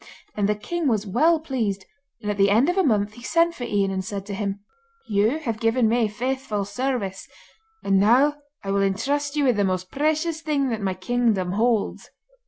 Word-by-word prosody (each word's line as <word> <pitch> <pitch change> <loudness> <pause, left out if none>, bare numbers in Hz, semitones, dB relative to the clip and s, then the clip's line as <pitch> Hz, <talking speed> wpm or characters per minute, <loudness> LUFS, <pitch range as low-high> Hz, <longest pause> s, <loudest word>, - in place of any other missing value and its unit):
And 205 -1 +1
the 210 - +2
king 330 +10 -3
was 220 -4 +1
well 310 - +3
pleased, 225 -11 -2 0.4
and 210 - -1
at 205 - -4
the 200 0 +4
end 230 - +4
of 355 - 0
a 385 - +3
month 215 - +1
he 240 - -13
sent 335 +6 +2
for 250 -7 -6
Ian 200 -3 0
and 190 0 -2
said 195 0 -5
to 205 - -6
him: 200 0 -3 0.4
'You 215 +6 +1
have 230 -9 -4
given 225 +1 +2
me 230 0 +2
faithful 230 -1 -3
service, 205 -3 -3 0.6
and 195 -1 +3
now 260 +8 +4 0.3
I 195 - -3
will 200 0 +2
entrust 280 +10 0
you 295 - +1
with 250 -5 +3
the 205 - +2
most 185 -1 -2
precious 310 +3 0
thing 290 -4 0
that 225 -2 -3
my 190 -2 -1
kingdom 200 -2 0
holds. 225 +1 0
225 Hz, 200 wpm, -24 LUFS, 200-275 Hz, 0.6 s, the